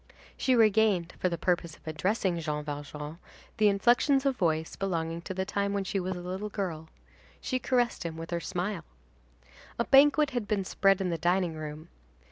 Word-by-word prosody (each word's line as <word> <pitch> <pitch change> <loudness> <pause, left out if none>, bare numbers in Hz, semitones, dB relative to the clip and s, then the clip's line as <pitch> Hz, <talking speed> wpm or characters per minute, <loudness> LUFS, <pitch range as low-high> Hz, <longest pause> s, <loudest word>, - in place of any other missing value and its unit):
She 260 - +2
regained, 215 -6 +3
for 185 - +1
the 170 - -3
purpose 170 -1 -1
of - - -24
addressing 175 +3 0
Jean 150 -2 -3
Valjean, 150 +2 -6 0.4
inflections 240 +7 +4
of 275 -1 +2
voice 160 -5 0
belonging 170 -3 -2
to 190 - -5
the 190 0 -1
time 200 +1 -1
when 200 -1 0
she 195 +1 -2
was 185 0 -3
a 175 - -6
little 190 +4 -4
girl. 170 -6 -4 0.5
She 255 - -2
caressed 245 -2 +1
him 165 -1 -5
with 165 +1 -7
her 170 - 0
smile. 175 +2 -3 0.9
A 235 - 0
banquet 290 +1 +5
had 240 -5 -2
been 200 -2 0
spread 195 +1 +3
in 185 - 0
the 165 - -2
dining 175 +1 +1
room. 155 0 -7
185 Hz, 180 wpm, -29 LUFS, 165-210 Hz, 0.9 s, banquet